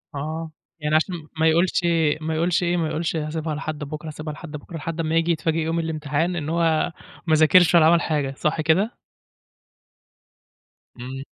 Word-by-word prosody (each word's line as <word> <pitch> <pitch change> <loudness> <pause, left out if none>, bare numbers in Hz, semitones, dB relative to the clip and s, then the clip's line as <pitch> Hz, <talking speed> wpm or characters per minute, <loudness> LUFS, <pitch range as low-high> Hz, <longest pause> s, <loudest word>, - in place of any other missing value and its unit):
آه. 155 +3 -4 0.3
يعني 150 0 0
عشان 175 +3 +1 0.2
ما 160 - +4
يقولش 170 +3 +3 0.4
ما 160 0 -2
يقولش 170 +2 +1
إيه، 175 0 +1
ما 165 -2 0
يقولش 160 +2 -2
هاسيبها 155 0 -3
لحد 155 0 -5
بُكرة، 150 +2 -7
هاسيبها 155 0 -6
لحد 155 +1 -10
بُكرة، 150 +2 -8
لحد 165 +1 -5
امّا 160 0 0
ييجي 165 +1 +2
يتفاجئ 160 0 0
يوم 165 +1 -1
الامتحان 160 +1 -1
إن 155 -2 -3
هو 165 0 +1 0.4
ما 160 - +4
ذاكرش 170 +3 +5
ولا 160 -2 +7
عمل 170 +1 +5
حاجة، 145 -4 -1
صح 155 +1 0
كده؟ 185 +9 +1 2.0
إمم. 130 +2 -6
160 Hz, 170 wpm, -23 LUFS, 155-165 Hz, 2.0 s, ولا